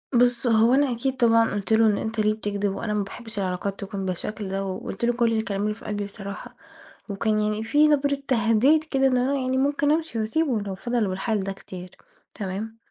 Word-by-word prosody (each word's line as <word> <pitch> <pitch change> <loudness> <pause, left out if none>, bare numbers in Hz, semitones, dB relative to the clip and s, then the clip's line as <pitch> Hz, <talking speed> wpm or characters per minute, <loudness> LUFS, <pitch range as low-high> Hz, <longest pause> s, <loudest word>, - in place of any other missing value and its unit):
بُصّ، 245 0 +3
هو 225 +1 +4
أنا 280 -1 +3
أكيد 255 +3 -2
طبعًا 230 -2 +4
قُلت 205 +2 -1
له: 225 +1 +5
"إن 205 - +2
أنت 220 0 -3
ليه 215 0 +3
بتكدب؟ 205 -2 -2
وأنا 215 -2 -3
ما 210 - 0
باحبش 220 +2 -7
العلاقات 190 +1 -2
تكون 195 -1 -5
بالشكل 195 +2 -4
ده." 195 +1 -2
وقُلت 195 +3 -4
له 240 - +2
كل 235 -1 +1
الكلام 205 -2 -2
اللي 210 0 0
في 220 - -14
قلبي 205 -1 -3
بصراحة، 200 +4 -8 0.5
وكان 215 +2 0
يعني 210 +1 -1
في 295 +7 +4
نبرة 285 -1 +2
تهديد 245 +6 +3
كده، 270 -4 +1
إن 255 -1 +2
أنا 260 +3 +1
يعني 260 -1 -1
ممكن 285 +2 +2
أمشي 315 -6 -1
وأسيبه 225 +1 0
لو 195 -2 -5
فضل 235 +1 -1
بالحال 195 +2 -1
ده 195 - -3
كتير، 185 -2 -9 0.5
تمام؟ 210 +3 -5
220 Hz, 205 wpm, -24 LUFS, 200-250 Hz, 0.5 s, له